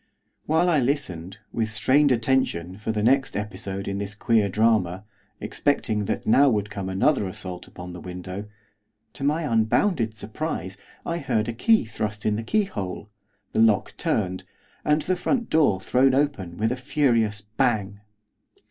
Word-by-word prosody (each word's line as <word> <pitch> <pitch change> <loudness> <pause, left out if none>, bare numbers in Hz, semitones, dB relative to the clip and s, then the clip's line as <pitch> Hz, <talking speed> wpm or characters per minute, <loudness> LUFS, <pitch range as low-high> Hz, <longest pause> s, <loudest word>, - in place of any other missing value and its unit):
While 160 +3 +3
I 165 -4 +4
listened, 100 - -2 0.2
with 110 -2 0
strained 135 +6 +3
attention, 115 -8 +1
for 110 +1 -2
the 105 -1 -1
next 135 +2 +2
episode 100 -1 -5
in 100 0 -2
this 100 0 -4
queer 110 -1 +2
drama, 105 -3 +2 0.4
expecting 110 -7 0
that - - -2
now 140 +5 +5
would 105 -3 -1
come 95 -2 -4
another 100 +4 +2
assault 90 -1 -6
upon 90 0 -9
the 90 - -8
window, 90 +2 -6 0.7
to 100 - -8
my 150 +4 +1
unbounded 115 - +1
surprise 105 - -4 0.3
I 170 0 -2
heard 120 -6 0
a 115 - -2
key 220 - +3
thrust 105 -1 -4
in 105 - +2
the 110 - -2
keyhole, 110 - -2 0.4
the - - +1
lock 110 -3 +3
turned, 95 -3 -1 0.4
and 150 +1 +2
the 185 - +1
front 235 +6 -1
door 145 -12 +3
thrown 130 +7 +3
open 120 -12 -1
with 110 +2 +1
a - - 0
furious 120 -6 +1
bang. 105 -2 -1
110 Hz, 155 wpm, -25 LUFS, 100-135 Hz, 0.7 s, now